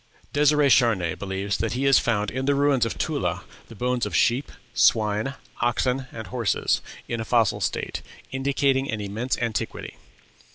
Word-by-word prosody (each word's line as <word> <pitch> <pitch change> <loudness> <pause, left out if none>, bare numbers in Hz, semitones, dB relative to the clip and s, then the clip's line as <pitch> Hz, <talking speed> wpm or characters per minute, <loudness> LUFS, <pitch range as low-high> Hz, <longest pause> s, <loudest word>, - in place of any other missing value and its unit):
Dêsirè 150 0 +4
Charnay 105 -11 +3
believes 100 +1 -3
that 115 - -1
he 130 +3 -2
has 135 -1 +6
found 105 -3 0
in 130 +1 -3
the 140 0 +2
ruins 140 -4 +3
of - - -5
Tula - - -1 0.2
the 115 - -12
bones 125 +2 -1
of - - -5
swine, 115 -4 +1
sheep, 135 - -6 0.3
oxen, 125 +2 0
and 110 -1 -7
horses, 115 +1 0 0.3
in 115 -1 -2
a - - -2
fossil 115 -2 +2
state, - - -2 0.3
indicating 135 0 +1
an 110 - -2
immense 105 +5 -2
antiquity. 115 -3 -3
120 Hz, 160 wpm, -24 LUFS, 110-135 Hz, 0.3 s, has